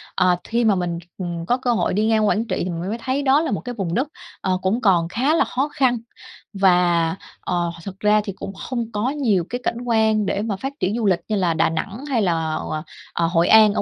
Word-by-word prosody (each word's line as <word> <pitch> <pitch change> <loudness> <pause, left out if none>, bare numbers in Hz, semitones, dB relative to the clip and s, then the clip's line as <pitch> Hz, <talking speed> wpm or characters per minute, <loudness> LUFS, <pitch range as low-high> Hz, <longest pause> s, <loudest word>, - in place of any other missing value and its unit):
Ờ, 180 -1 +4
thi 235 +1 0
mà 215 -3 +4
mình, 175 -2 -2 0.2
ừm, 175 -3 -4
có 245 +8 +2
cơ 250 -2 0
hội - - 0
đi 210 +3 +1
ngang 220 -1 +3
Quảng 220 +2 +1
Trị 185 - -1
thì 180 - -2
mình 175 +2 -4
mới 225 - -2
thấy 260 +4 -1
đó 275 +2 +4
là 320 - -2
một - - -1
cái 245 -1 -6
vùng 190 -6 -3
đất, 260 +8 +1 0.3
ờ, 185 -1 +1
cũng 205 +6 0
còn 180 -6 +3
khá 255 - +1
là - - +3
khó 265 +3 -1
khăn, 255 -3 +2 0.6
và, 175 -4 +3 0.3
ờ, 175 -2 -1
th - - -16
thật 195 0 -8
ra 210 0 +4
thì 200 - -5
cũng 195 +1 -7
không 235 +2 -4
có 210 +4 0
nhiều 230 - +1
cái 245 +1 -4
cảnh 235 0 -2
quan 220 -2 +2
để 200 - -1
mà 215 -2 -2
phát 270 +9 -5
triển 195 +4 0
du 230 - -1
lịch 185 -4 +3
như 215 - 0
là 180 -4 +1
Đà 160 - +2
Nẵng 195 - -4
hay 245 -5 +2
là, 165 -4 0
ờ, 155 0 -4 0.3
ờ, 170 - +1
Hội 170 0 +2
An 215 -2 +7
ở - - 0
205 Hz, 255 wpm, -22 LUFS, 180-235 Hz, 0.6 s, An